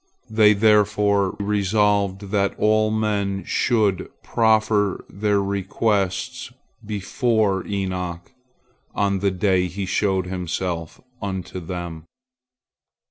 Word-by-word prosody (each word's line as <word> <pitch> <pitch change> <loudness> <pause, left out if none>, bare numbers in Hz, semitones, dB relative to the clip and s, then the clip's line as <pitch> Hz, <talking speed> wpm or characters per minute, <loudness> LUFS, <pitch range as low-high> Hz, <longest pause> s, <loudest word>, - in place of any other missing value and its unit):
They 110 -1 +6
therefore 105 -2 +3
resolved 100 -1 +1
that 100 -1 +1
all 110 0 +3
men 105 -3 -1
should 105 -6 +1
prefer 110 -3 +2
their 105 +1 0
requests 100 +4 -1 0.3
before 105 -1 0
Enoch 90 -3 -4 0.6
on 100 -1 +1
the 100 +1 +2
day 95 -1 +1
he 95 +2 -4
showed 95 -1 0
himself 90 -2 -4 0.2
unto 95 -2 -4
them. 85 -2 -6
100 Hz, 90 wpm, -22 LUFS, 95-105 Hz, 0.6 s, They